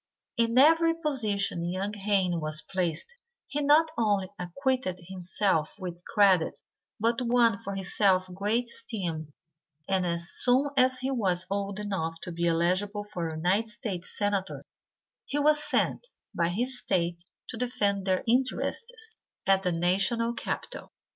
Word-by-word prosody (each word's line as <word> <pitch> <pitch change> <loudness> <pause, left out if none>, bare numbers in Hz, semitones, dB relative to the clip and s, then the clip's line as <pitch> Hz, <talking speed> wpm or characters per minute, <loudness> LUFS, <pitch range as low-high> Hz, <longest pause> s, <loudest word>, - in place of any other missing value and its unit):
In 230 +1 +2
every 325 +4 +6
position 215 - -1
young 195 +3 -2
Haynes 195 -3 +1
was 155 +1 -2
placed 180 - -2 0.3
he 295 - -3
not 305 +3 +4
only 205 -4 +1
acquitted 190 +2 -1
himself 180 -2 -1
with 180 -3 -7
credit 190 -5 +4 0.4
but 230 +3 +1
won 235 -4 +3
for 200 0 -5
himself 190 -1 +2
great 210 +6 +1
esteem, 170 -10 -4 0.6
and 190 -1 +1
as 170 0 -1
soon 260 +3 +3
as 255 -1 +4
he 260 +1 -2
was 185 -8 0
old 200 0 -2
enough 165 -6 -3
to 180 - -6
be 170 0 -1
elligible 185 +5 0
for 170 -2 -2
United 180 +8 +1
States 200 -4 -5
Senator 205 -2 -1 0.6
he 285 - -2
was 300 +1 +4
sent - - 0 0.3
by 170 0 +1
his 245 +7 -2
State 170 -1 -1 0.3
to - - -2
defend 205 -5 0
their 185 -1 +1
interests 445 - 0 0.3
at 195 0 +4
the 180 -2 0
national 195 +7 +2
capitol. - - -5
200 Hz, 140 wpm, -28 LUFS, 180-245 Hz, 0.6 s, every